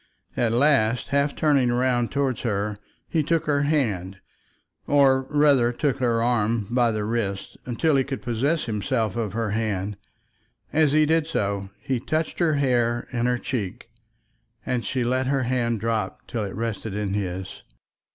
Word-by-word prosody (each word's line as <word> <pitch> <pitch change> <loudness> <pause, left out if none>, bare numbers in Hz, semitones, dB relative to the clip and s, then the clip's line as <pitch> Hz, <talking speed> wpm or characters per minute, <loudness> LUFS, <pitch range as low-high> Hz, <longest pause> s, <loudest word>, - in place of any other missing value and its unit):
At 115 -2 +1
last, 125 -2 +2
half 140 +1 +1
turning 140 -5 +3
round 120 -1 +1
towards 140 -3 0
her 105 -2 -2 0.3
he 160 - +1
took 165 +2 0
her 145 -1 +2
hand, 110 - 0 0.7
or 135 -2 +4
rather 145 -5 +4
took 135 +2 -1
her 120 -3 +1
first 115 -2 0
by 120 -1 +3
the 110 -1 -2
wrist 105 -4 -2 0.2
till 160 -4 +3
he 135 - +3
could 135 -5 -5
possess 135 +7 0
himself 110 -1 -1
of 110 -4 -2
her 115 -2 -1
hand. 105 -2 -2 0.8
As 150 -2 +3
he 155 0 +5
did 160 0 +2
so 100 -10 -2
he 130 -2 -2
touched 155 +6 -2
her 165 -4 +3
hair 120 -4 +1
and 120 -1 0
her 125 0 +1
cheek, 115 -3 -4 0.7
and 125 -2 -1
she 130 -2 -1
let 130 +2 0
her 135 -1 +1
hand 120 -2 0
drop 110 -3 -2
till 110 -3 -3
it 95 - -6
rested 110 -2 -3
in 105 -2 -2
his. 95 -2 -4
120 Hz, 160 wpm, -24 LUFS, 110-140 Hz, 0.8 s, he